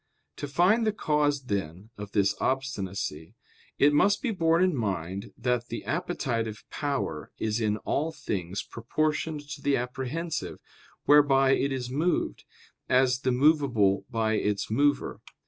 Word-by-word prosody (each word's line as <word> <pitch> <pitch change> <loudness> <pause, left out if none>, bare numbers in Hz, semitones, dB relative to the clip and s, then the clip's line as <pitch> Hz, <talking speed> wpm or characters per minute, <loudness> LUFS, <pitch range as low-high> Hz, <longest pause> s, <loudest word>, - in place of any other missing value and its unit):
To 145 - -4
find 180 +11 +3
the - - +3
cause, 150 -7 +1
then, 100 -2 -4
of 105 -1 -8
this 100 0 +3
obstinacy, 100 - -3 0.4
it 145 +1 +5
must 200 - +3
be 250 - 0
borne 165 -3 +3
in 185 -4 +2
mind 100 -4 -3
that 125 0 -1
the 115 -4 -6
appetitive 120 - -2
power 140 - -3
is 110 +1 -1
in 105 -1 +1
all 155 +8 -1
things 95 - -4
proportioned 150 +4 -2
to - - -6
the 140 -1 +2
apprehensive, 130 +7 -4 0.5
whereby 135 -2 +5
it 135 +1 +2
is 125 -2 -3
moved, 160 +6 -1 0.4
as 125 0 +3
the 130 - 0
movable 125 -8 +3
by 110 -3 0
its 105 -1 -1
mover. 145 +5 +1
130 Hz, 140 wpm, -27 LUFS, 105-150 Hz, 0.5 s, it